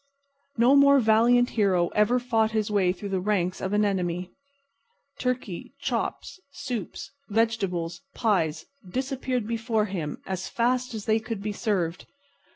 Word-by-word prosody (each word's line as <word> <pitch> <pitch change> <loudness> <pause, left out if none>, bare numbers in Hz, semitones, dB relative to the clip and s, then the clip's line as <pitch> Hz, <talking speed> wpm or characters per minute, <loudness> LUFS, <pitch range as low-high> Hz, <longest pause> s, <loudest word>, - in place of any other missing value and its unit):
No 245 +4 +5
more 280 0 +7
valiant 240 +2 +4
hero 185 -5 +2
ever 210 +4 +3
fought 225 -3 +1
his 215 -1 0
way 190 -3 +3
through 195 +3 -6
the 190 - +1
ranks 185 -2 0
of 190 - -2
an 210 0 +3
enemy. 180 -2 -1 0.9
Turkey, 250 -8 -3
chops, - - -3
soups, 250 -8 -6 0.2
vegetables, 200 -6 0
pies, 165 -9 0 0.2
disappeared 260 0 -2
before 225 -1 0
him 170 -7 -4
as 190 -1 -4
fast 245 +1 0
as 215 - -6
they 220 0 +3
could 220 -2 -5
be 210 0 -2
served. 190 -6 -2
215 Hz, 140 wpm, -26 LUFS, 185-240 Hz, 0.9 s, more